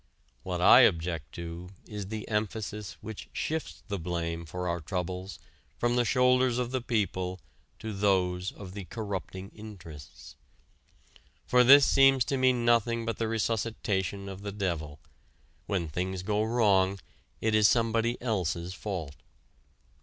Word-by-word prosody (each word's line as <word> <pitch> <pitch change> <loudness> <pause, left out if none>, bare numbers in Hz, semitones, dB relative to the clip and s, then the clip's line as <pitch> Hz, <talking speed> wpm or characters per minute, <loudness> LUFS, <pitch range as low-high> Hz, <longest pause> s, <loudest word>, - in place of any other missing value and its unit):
What - - -3
I - - +9
object 80 -3 +2
to 85 +1 -7 0.2
is 105 -2 -6
the 110 0 -5
emphasis 105 -1 -3
which 110 -1 -8
shifts 160 -1 -3
the 100 -3 -3
blame 85 -1 -3
for 90 +3 -4
our 85 0 -1
troubles 90 +2 -4 0.4
from 120 0 +1
the 120 0 +2
shoulders 125 0 +3
of 125 -1 -2
the 130 -1 -1
people 95 -6 -1 0.4
to 110 -1 -6
those 95 -2 +1
of 95 -3 -10
the 100 -2 -7
"corrupting 95 -3 -5
interests." 90 -9 -11 1.1
For 125 0 +5
this 140 +3 +8
seems 135 -2 +5
to 135 - -1
me 130 0 +4
nothing 120 -1 +2
but 115 -2 -2
the 115 - 0
resuscitation 105 -4 -1
of 95 0 -7
the 100 0 -5
devil: 85 -7 -3 0.7
when 90 -5 -1
things 90 +4 -3
go 105 +2 0
wrong 100 -4 +2 0.4
it 110 -1 0
is 110 -1 +6
somebody 115 +1 +1
else's 90 -6 -1
fault. 85 -9 -5
100 Hz, 140 wpm, -29 LUFS, 90-115 Hz, 1.1 s, I